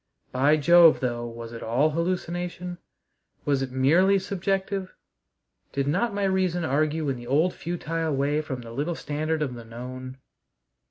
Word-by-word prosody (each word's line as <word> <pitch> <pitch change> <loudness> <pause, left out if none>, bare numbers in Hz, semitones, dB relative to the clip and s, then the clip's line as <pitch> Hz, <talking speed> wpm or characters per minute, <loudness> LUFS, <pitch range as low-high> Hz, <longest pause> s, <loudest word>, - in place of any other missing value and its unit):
By 140 +4 +3
Jove, 170 +2 +7
though, 120 -2 -2
was 115 0 -8
it 115 - -7
all 130 +7 +2
hallucination? 175 +1 -3 0.7
Was 140 -2 +2
it 135 - -2
merely 165 +10 +4
subjective? 195 0 -2 0.8
Did 140 0 -1
not 195 +10 +1
my 200 0 -2
reason 185 -3 +1
argue 155 +2 0
in 135 -2 -1
the 120 0 -10
old 155 +8 +2
futile 165 -2 -2
way 145 +3 +1
from 135 -5 -5
the 115 -1 -10
little 150 +8 -2
standard 155 +1 -2
of 135 -4 -3
the 120 -1 -8
known? 130 +3 -8
155 Hz, 155 wpm, -26 LUFS, 130-175 Hz, 0.8 s, Jove